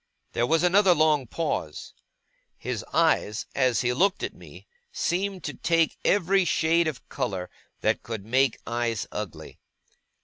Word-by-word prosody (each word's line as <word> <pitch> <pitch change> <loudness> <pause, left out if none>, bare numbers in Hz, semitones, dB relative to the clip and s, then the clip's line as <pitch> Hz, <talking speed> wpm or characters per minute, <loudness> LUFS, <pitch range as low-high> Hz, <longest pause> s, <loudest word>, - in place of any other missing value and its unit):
There 120 - +1
was 165 +4 +2
another 185 0 +5
long 150 -4 +2
pause. 110 - -3 0.6
His - - -4
eyes, 105 +1 +1
as 130 -3 +2
he 125 -1 +1
looked 190 +8 +1
at - - -3
me, - - -14 0.3
seemed 190 +1 -2
to 150 - -4
take 165 -1 +1
every 195 0 +3
shade 170 -1 +2
of 145 -5 -5
colour 95 -10 -3 0.3
that - - +1
could 110 -4 -6
make 130 +1 +2
eyes 115 -2 -1
ugly. - - -7
150 Hz, 140 wpm, -26 LUFS, 120-175 Hz, 0.6 s, another